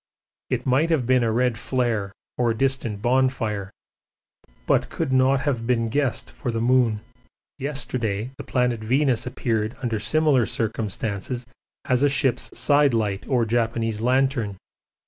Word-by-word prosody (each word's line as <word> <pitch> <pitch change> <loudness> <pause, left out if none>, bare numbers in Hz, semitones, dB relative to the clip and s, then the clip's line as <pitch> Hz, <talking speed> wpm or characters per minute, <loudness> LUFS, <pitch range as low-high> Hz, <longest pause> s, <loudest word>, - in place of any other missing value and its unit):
It - - -1
might 135 +6 +2
have 155 -7 +1
been 130 +1 +3
a 115 - +1
red 120 0 +1
flare 115 -7 -1 0.2
or 120 -2 +1
distant 120 -5 -1
bonfire, 120 -6 +1 1.0
but - - +2
could 130 - -2
not 130 +1 +3
have 125 -6 -1
been 115 -2 +1
guessed 140 +1 -1
for 130 - -5
the 115 -1 -1
moon. 120 -3 +2 0.6
Yesterday 125 -5 -2
the - - -8
planet 125 -2 0
Venus 130 +1 +1
appeared 115 -1 -2
under 115 -3 -1
similar 140 +1 +3
circumstances 110 +2 -3 0.4
as 125 0 +1
a 145 - +4
ship's 135 -4 +1
side 145 0 +4
light 105 -3 -1
or 125 -4 +2
Japanese 115 -1 -1
lantern. 125 -4 +1
120 Hz, 140 wpm, -24 LUFS, 110-130 Hz, 1.0 s, a